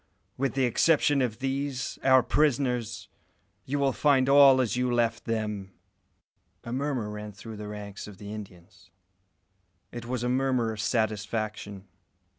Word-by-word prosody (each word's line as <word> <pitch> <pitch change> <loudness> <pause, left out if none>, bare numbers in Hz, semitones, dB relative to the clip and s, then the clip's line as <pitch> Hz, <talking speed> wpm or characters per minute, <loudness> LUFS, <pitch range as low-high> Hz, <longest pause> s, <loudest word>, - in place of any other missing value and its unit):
With 135 -2 -1
the 135 - +2
exception 145 +2 +3
of 115 -4 -1
these, 135 0 -3
our 130 -1 +6
prisoners, 125 -4 0 0.6
you 140 +2 -2
will 140 -2 +1
find 135 -2 +3
all 140 -1 +7
as 125 -3 +1
you 125 0 0
left 120 -1 0
them." 105 -4 -3 0.9
A 115 - -6
murmur 135 -4 -1
ran 105 0 -7
through 110 +2 -9
the 105 0 -7
ranks 105 -1 -7
of 105 -2 -11
the 100 +1 -8
Indians. 95 -2 -11 1.0
It 120 0 -7
was 125 -1 -2
a - - 0
murmur 130 -2 +1
of 110 -1 -5
satisfaction. 110 -3 -2
120 Hz, 145 wpm, -27 LUFS, 105-130 Hz, 1.0 s, all